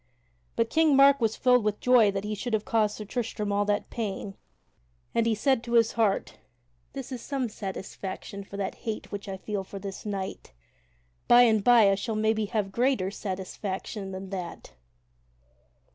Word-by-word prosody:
But 230 0 0
King 320 -3 +4
Mark 275 0 +6
was 225 -1 +1
filled 250 -2 +4
with 210 -1 -1
joy 245 -4 +5
that 195 0 -2
he 210 0 -3
should 225 +3 -4
have 215 -1 0
caused 215 -2 +1
Sir 215 - -6
Tristram 215 -1 -3
all 205 0 +1
that 205 0 -1
pain, 200 -3 -4 0.8
and 230 0 +2
he 225 - +2
said 260 +2 +1
to 240 -1 -5
his 230 -1 +5
heart: 215 -4 0 0.5
"This 270 -1 -7
is 250 -3 -5
some 270 -2 -2
satisfaction 195 -1 -6
for 200 +1 -9
the 195 -1 -2
hate 220 -2 -6
which 200 0 -6
I 190 - -4
feel 200 0 -4
for 195 - -9
this 195 0 -7
knight; 195 - -5 0.7
by 240 +1 +8
and 220 -4 +3
by 230 -4 +6
I - - +3
shall 215 +3 -2
maybe 220 0 +1
have 205 -1 -2
greater 235 -5 +1
satisfaction 195 +1 -5
than 190 0 -7
that." 180 -3 -6
210 Hz, 175 wpm, -27 LUFS, 195-235 Hz, 0.8 s, by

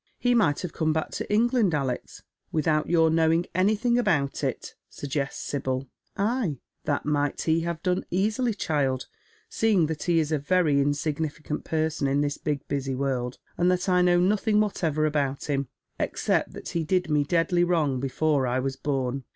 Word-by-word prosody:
" - - -42
He 245 0 +2
might 175 -12 +2
have 180 -3 -5
come 155 -1 +1
back 160 0 -2
to - - -5
England, 225 -4 +3
Alex, 130 -4 -3 0.3
without 155 -1 +1
your 165 -2 +4
knowing 165 +1 +3
anything 215 +6 +2
about 150 - 0
it," - - -3 0.2
suggests 140 -1 -4
Sibyl. 130 -2 -3 0.2
" - - -45
Ay, 210 - 0 0.3
that 145 - -1
might 145 -1 0
he 160 0 +2
have 170 -1 -4
done 180 -1 0
easily, 215 +5 0
child, 140 -8 0 0.4
seeing 210 -7 +2
that 155 -1 -4
he 175 -2 +2
is 160 -1 +1
a 155 - +1
very 150 -2 +2
insignificant 150 +1 -2
person 155 -3 0
in 140 +1 +1
this 145 0 -2
big 145 -2 -3
busy 135 -2 -2
world, 130 -2 -2 0.2
and 175 +1 +4
that 180 +1 0
I 180 -1 +4
know 175 0 +4
nothing 210 +3 +2
whatever 160 -7 0
about 140 -3 -1
him, 140 -2 -1 0.3
except - - 0
that - - -8
he 170 - -1
did 180 +2 +1
me 150 -1 +3
deadly 175 +3 +2
wrong 155 -7 +1
before 140 +1 +1
I 125 +1 0
was 135 +1 -1
born." 135 -2 -2
155 Hz, 180 wpm, -26 LUFS, 140-180 Hz, 0.4 s, your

